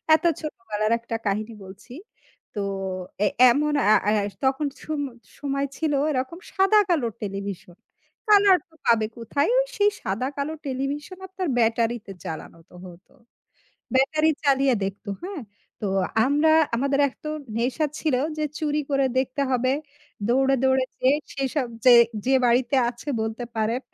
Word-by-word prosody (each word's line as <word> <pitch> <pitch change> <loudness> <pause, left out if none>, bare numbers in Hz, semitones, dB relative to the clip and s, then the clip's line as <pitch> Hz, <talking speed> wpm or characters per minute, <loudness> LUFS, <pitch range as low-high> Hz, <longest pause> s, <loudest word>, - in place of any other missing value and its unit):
এত - - -2 0.2
ছোটবেলার 225 -8 -3
একটা 230 0 -5
কাহিনী 215 +3 -2
বলছি। 190 +6 -13 0.6
তো 210 - -4 0.7
এ - - +4 0.2
এমন 295 +3 +1 0.2
আ - - +8 0.2
আ - - +3 0.3
তখন 270 +3 +1 0.2
সম 310 -2 -3 0.4
সময় 275 -1 -1
ছিল 315 -2 0 0.2
এরকম 265 +5 -3
সাদা-কালোর 380 - +3
টেলিভিশন। 195 -3 -6 0.5
কালার 400 -3 +6
তো 320 - -25
পাবে 225 -2 +4
কোথায়? 280 +6 0 0.3
সেই 410 -1 +4
সাদা-কালো 275 +9 -2
টেলিভিশন 280 +6 -4
আপনার 375 -1 -4
ব্যাটারিতে 225 -1 0
চালানো 160 +1 -7
তো - - -22
হত। 180 +1 -13 0.9
ব্যাটারি 305 +4 +3 0.2
চালিয়ে 275 -2 +3
দেখত, 195 +2 -5 0.2
হ্যাঁ? 370 -2 -5 0.4
তো 210 - -2 0.4
আমরা 295 +3 +3 0.3
আমাদের 275 +3 +1
এক 260 - -14
তো - - -3
একটা 275 -6 -13
নেশা 255 +6 0
ছিল 310 -4 0 0.2
যে 305 - 0
চুরি 300 -1 -1
করে 275 -1 +2
দেখতে 265 +2 -1
হবে। 255 0 +2 0.6
দৌড়ে, 270 +2 +3
দৌড়ে 265 0 +3 0.2
যে 255 - +3 0.3
সেসব 270 0 -1 0.2
যে 250 - +8 0.3
যে 265 - +3
বাড়িতে 245 +2 +2
আছে 240 +4 -8
বলতে 220 +2 -4
পারেন। 220 +3 0
265 Hz, 140 wpm, -24 LUFS, 230-295 Hz, 0.9 s, আ